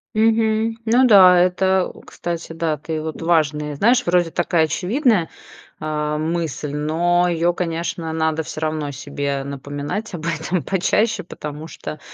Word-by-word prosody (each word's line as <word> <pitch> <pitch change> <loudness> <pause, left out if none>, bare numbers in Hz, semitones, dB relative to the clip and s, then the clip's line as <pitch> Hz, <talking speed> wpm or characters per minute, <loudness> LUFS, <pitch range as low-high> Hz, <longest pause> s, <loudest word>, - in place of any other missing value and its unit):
Мгм. 220 0 +2
Ну 240 +3 +4
да, 190 -6 +8
это, 190 +1 +2
э, - - -15
кстати, 170 -1 -5
да, 160 -2 -1
ты 155 +2 -4
вот, 160 +1 -6
важная 150 -3 +1
Знаешь, 240 - +3
вроде 175 -1 +2
такая 175 -1 +1
очевидная, 195 - +1 0.5
а, 150 0 -2
мысль, 160 -2 -2
но 170 +4 +1
ее 170 0 +1
конечно 165 -1 -3
надо 160 0 0
всё 155 - -7
равно 155 -2 -2
себе 140 0 -3
напоминать 145 +9 -5
об 165 -2 -6
этом 170 +1 -1
почаще. 210 +4 +1
Потому 150 -2 -7
что 155 - -8
165 Hz, 145 wpm, -21 LUFS, 155-185 Hz, 0.5 s, да